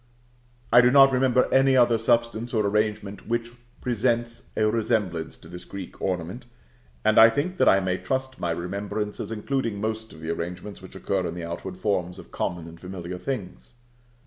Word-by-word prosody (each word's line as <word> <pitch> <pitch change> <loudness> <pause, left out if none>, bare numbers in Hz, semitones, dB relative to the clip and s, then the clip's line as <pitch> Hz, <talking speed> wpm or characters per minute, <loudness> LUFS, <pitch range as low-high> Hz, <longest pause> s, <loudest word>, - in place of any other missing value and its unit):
I 120 - +8
do 125 - +5
not 135 +1 +7
remember 130 -1 +3
any 135 0 +5
other 120 -2 +4
substance 115 +1 +1
or 105 -2 +2
arrangement 105 -1 -1
which 120 +1 -1 0.3
presents 120 0 -1
a 110 - +2
resemblance 105 -7 0
to - - -15
this 90 +1 -9
Greek 95 -3 -9
ornament; 95 +6 -3 0.6
and 110 - +5
I 115 +1 +10
think 155 +11 -2
that - - +5
I 95 - +5
may 95 0 -1
trust 130 0 -3
my 85 - -1
remembrance 100 +5 -3
as - - -5
including 115 -1 -2
most 110 +1 -3
of 80 - -13
the 80 +1 -3
arrangements 90 +5 -5
which 95 - -12
occur 95 -1 -1
in 85 - -5
the 85 -1 -5
outward 90 +2 -6
forms 90 -3 -1
of - - -12
common 85 -2 -3
and 85 0 -12
familiar 90 -1 -7
things. 115 -3 -5
105 Hz, 180 wpm, -25 LUFS, 90-120 Hz, 0.6 s, I